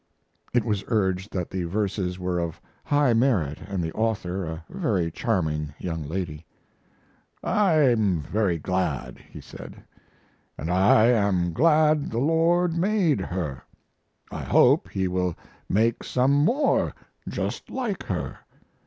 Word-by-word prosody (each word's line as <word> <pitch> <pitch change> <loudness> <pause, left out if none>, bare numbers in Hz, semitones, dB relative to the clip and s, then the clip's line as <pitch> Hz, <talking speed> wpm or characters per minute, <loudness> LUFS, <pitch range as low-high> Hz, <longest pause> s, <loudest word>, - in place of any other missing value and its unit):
It 120 -2 +1
was 105 -4 -1
urged 95 -3 0
that 90 -3 -3
the 95 -2 -2
verses 95 -1 -2
were 90 -1 -2
of 85 -1 -4 0.2
high 145 -5 +3
merit 110 - +1
and 95 -3 -2
the 80 - -3
author 100 -5 -1
a 80 +1 -6
very 105 - -1
charming 75 - -1
young 80 -3 -4
lady. 80 0 -4 1.0
"I'm 130 - +3
very 95 +1 0
glad," 90 -4 -2
he - - -13
said, - - -11 0.7
"and 80 +4 -3
I 95 +4 +5
am 100 -7 +2
glad 155 - +3
the 115 - -4
Lord 165 +5 +2
made 180 - +2
her; 85 -8 -4 0.7
I - - -5
hope - - +4
He 95 -1 -1
will 90 -1 -1 0.3
make 115 +4 +1
some 130 +2 +1
more 235 - +2 0.3
just - - -4
like 235 -8 -3
her. 85 -9 -4
100 Hz, 130 wpm, -25 LUFS, 90-135 Hz, 1.0 s, I